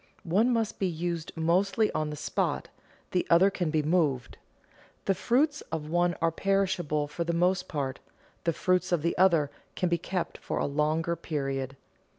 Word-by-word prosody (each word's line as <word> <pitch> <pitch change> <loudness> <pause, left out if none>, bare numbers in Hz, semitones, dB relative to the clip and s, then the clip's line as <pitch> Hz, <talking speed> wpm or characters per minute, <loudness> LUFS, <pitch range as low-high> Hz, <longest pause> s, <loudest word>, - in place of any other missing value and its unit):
One 200 +8 +3
must 225 -3 0
be 195 - +1
used 170 -1 -3
mostly 190 +6 +2
on 155 -1 -1
the 150 - -4
spot, 145 - -1 0.4
the 180 - +2
other 180 +4 +6
can 175 -4 -1
be 155 -1 +1
moved. 150 -7 +1 0.7
The 195 - +3
fruits 275 - +1
of 155 -1 -4
one 175 0 +2
are 165 0 +2
perishable 185 -5 0
for 150 +3 -3
the 170 0 -1
most 180 +2 +2
part; 140 -4 -3 0.4
the 170 - +2
fruits 185 +2 +1
of 170 -4 +1
the 170 - +1
other 170 -6 +4 0.2
can 180 - 0
be 170 -1 +1
kept 180 +1 -3
for - - -3
a - - +1
longer 155 +4 0
period. 135 -4 -3
170 Hz, 170 wpm, -28 LUFS, 155-185 Hz, 0.7 s, other